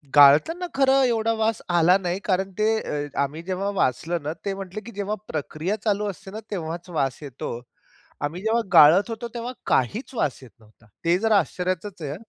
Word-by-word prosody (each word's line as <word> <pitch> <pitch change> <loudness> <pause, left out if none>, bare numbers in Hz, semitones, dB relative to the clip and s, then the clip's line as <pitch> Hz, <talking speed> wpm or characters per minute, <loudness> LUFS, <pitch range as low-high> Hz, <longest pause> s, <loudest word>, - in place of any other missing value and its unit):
गाळताना 155 - +6
खरं 270 0 +4
एवढा 230 -2 +1
वास 220 0 +1
आला 175 +2 +5
नाही 180 0 -3
कारण 190 0 0
ते 215 - +2 0.2
अ, 145 0 -3
आम्ही 145 +4 -2
जेव्हा 190 +2 -2
वाचलं 165 0 0
ना, 150 +2 -2
ते 195 - -1
म्हटले, 195 +1 -7
"की 235 - -10
जेव्हा 205 +1 -3
प्रक्रिया 155 +6 -3
चालू 210 -1 +1
असते 195 +1 -9
ना? 215 - -6
तेव्हाच 170 -1 -5
वास 135 -6 -1
येतो." 135 -4 -6 0.7
आम्ही 170 +5 -5
जेव्हा 225 +2 +1
गाळत 170 +7 +7
होतो 230 +1 -5
तेव्हा 240 +1 -4
काहीच 225 - 0
वास 145 - -1
येत 130 - -13
नव्हता. 110 +1 -23 0.2
ते 170 +2 +4
जरा 220 -2 +4
आश्चर्याचच 185 +1 -3
आहे. 145 +2 -4
185 Hz, 180 wpm, -24 LUFS, 155-215 Hz, 0.7 s, गाळत